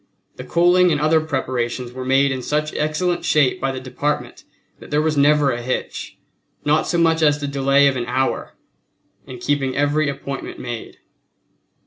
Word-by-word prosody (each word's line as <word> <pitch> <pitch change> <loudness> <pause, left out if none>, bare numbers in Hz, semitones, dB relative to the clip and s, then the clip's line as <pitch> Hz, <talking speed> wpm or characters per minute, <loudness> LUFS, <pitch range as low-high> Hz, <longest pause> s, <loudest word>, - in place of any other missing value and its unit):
The - - -7
coaling 175 +1 +3
and 150 - +1
other 155 +1 +3
preparations 125 -4 -3
were 130 +1 -6
made 135 +2 +3
in 130 -1 -3
such 150 +3 -2
excellent 170 +4 -1
shape 145 -4 +2
by 135 - 0
the 130 - -5
Department 130 +3 -3 0.4
that - - -13
there 150 - +1
was 155 0 +1
never 145 0 +4
a 120 - -3
hitch, 130 +2 -4 0.5
not 150 +1 +2
so 175 - 0
much 165 -1 +3
as 150 -1 +3
the 145 - -4
delay 140 0 +3
of 140 -1 +3
an 120 -2 -2
hour, 130 +2 -1 0.7
in 130 - -8
keeping 135 +1 -1
every 145 +1 +1
appointment 140 -1 -6
made. 120 -2 -7
140 Hz, 170 wpm, -20 LUFS, 130-155 Hz, 0.7 s, never